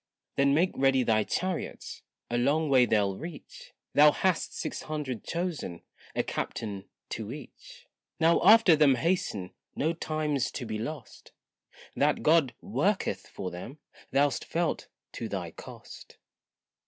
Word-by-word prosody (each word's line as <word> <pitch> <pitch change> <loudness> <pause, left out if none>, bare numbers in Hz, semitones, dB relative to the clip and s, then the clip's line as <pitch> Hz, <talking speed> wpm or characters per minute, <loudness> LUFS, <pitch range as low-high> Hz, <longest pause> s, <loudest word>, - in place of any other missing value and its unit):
Then 140 0 +3
make 180 +4 +3
ready 135 -1 +3
thy 110 -2 +2
chariots, 185 - -3 0.3
a - - 0
long 145 +6 +2
way 130 -3 +5
they'll 100 -3 +2
reach; 165 -1 -10 0.2
Thou 150 +1 +7
hast 185 +2 0
six - - -4
hundred 145 -7 -4
chosen, 165 - -4 0.3
a - - +1
captain 100 -3 -4 0.2
to 110 0 -5
each. 485 - -11 0.3
Now 165 +1 +4
after 210 -3 +8
them 145 -3 +5
hasten, 125 - -1 0.2
no 160 +3 0
time's 155 -4 -1
to 125 - -4
be 110 -1 -4
lost, 130 +1 -7 0.6
That - - +1
God 150 -6 +4
worketh 205 -1 -1
for 95 -2 -6
them, 105 +11 -8 0.3
thou'st 140 0 +2
felt 170 -1 -2 0.2
to 115 - -5
thy 90 -4 -4
cost. - - -12
145 Hz, 135 wpm, -29 LUFS, 115-165 Hz, 0.6 s, after